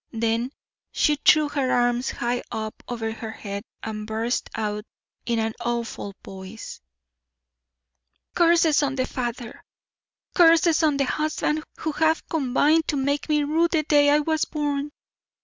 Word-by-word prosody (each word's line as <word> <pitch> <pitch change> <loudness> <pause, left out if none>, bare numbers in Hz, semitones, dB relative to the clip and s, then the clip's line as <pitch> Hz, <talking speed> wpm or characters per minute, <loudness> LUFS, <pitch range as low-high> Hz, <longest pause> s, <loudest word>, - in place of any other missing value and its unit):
Then 230 +2 0 0.4
she 300 -1 +2
threw 305 +1 +5
her 275 -3 -1
arms 245 +1 +1
high 240 +1 -2
up 220 0 -5
over 225 -2 -3
her 225 0 -7
head 200 -2 -6 0.2
and 215 -1 -5
burst 225 +3 -2
out 210 -1 -2 0.4
in 235 -1 +1
an 225 0 -1
awful 235 -4 -3
voice: 190 - -9 1.5
"Curses 335 -3 +4
on 280 -2 0
the 255 -1 0
father, 240 -2 -5 0.7
curses 330 -1 +5
on 300 -3 +2
the 275 - +2
husband, 310 +2 -1
who 315 - -2
have 320 +2 +1
combined 305 +2 +2
to 290 - 0
make 285 +3 -1
me 300 -1 +2
rue 320 +4 +2
the 320 -2 0
day 290 -1 +4
I 295 +1 +4
was 315 +1 0
born! 290 -1 -2
270 Hz, 145 wpm, -24 LUFS, 230-305 Hz, 1.5 s, threw